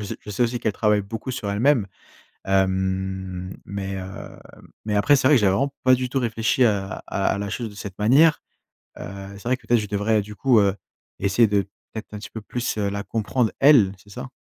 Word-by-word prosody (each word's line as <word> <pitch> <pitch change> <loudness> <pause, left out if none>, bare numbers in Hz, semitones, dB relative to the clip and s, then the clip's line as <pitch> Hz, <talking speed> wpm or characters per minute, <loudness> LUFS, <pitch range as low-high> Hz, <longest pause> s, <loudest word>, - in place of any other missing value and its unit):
s 100 - -5
je 105 - -9
sais 105 - 0
aussi 120 0 -2
qu'elle 110 - 0
travaille 105 -1 +2
beaucoup 110 +5 -6
sur 110 -5 -4
elle-même. 115 +1 +2 0.6
Hem, 95 -1 -1
mais, 95 0 -5
heu, 95 +1 -8 0.5
mais 105 -1 -1
après, 105 +8 +4
c'est 130 - +3
vrai 145 - +6
que 120 - +4
j'avais 100 -2 +4
vraiment 140 +7 0
pas 130 0 +6
du 125 0 -3
tout 135 - 0
réfléchi 115 +1 +1
à 100 -4 +1 0.2
à 95 - -2
à - - -4
la 100 0 -3
chose 115 +2 -3
de 105 - -13
cette 100 -2 -8
manière. 145 +9 +5 0.6
Heu, - - -6 0.3
c'est - - -14
vrai 125 +2 +2
que, - - -22
peut-être, 120 -1 +4
je 105 - -5
devrais, 105 +2 +1
du 105 +1 -10
coup, 125 0 +4
heu, 100 -1 +2 0.4
essayer 100 +4 +3
de 100 -1 +2 0.3
peut-être 110 -1 -8
un 105 - -5
petit 105 - -9
peu 110 - -7
plus, 120 +2 -3
heu, 100 -1 0
la 100 0 -4
comprendre 115 +2 -1
elle, 125 -9 +6
c'est 100 - -21
ça? 125 +5 -7
105 Hz, 225 wpm, -23 LUFS, 100-120 Hz, 0.6 s, vrai